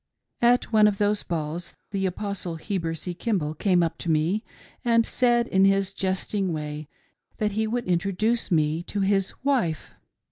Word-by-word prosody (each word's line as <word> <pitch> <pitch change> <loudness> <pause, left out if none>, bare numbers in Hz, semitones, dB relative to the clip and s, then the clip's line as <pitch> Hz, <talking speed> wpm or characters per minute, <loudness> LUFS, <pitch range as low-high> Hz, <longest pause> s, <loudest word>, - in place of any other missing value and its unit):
At 240 0 +3
one 215 -1 +6
of 205 -1 0
those 205 0 +1
balls 165 +1 -4 0.2
the 195 -1 0
Apostle 190 -2 -4
Heber 165 -1 -3
C. 175 +2 -5
Kimball 175 -6 -1
came 180 +2 +2
up 165 - -2
to 170 - -4
me 165 +7 +1 0.4
and 230 -2 +3
said 240 -1 +2
in 190 0 +3
his 195 0 +3
jesting 190 0 -1
way 150 -1 -5 0.5
that 210 -1 0
he 220 +2 0
would 240 +2 -2
introduce 195 +6 0
me 155 -2 +1
to 205 - -2
his 195 -1 +1
wife. 245 - 0
195 Hz, 165 wpm, -25 LUFS, 170-215 Hz, 0.5 s, one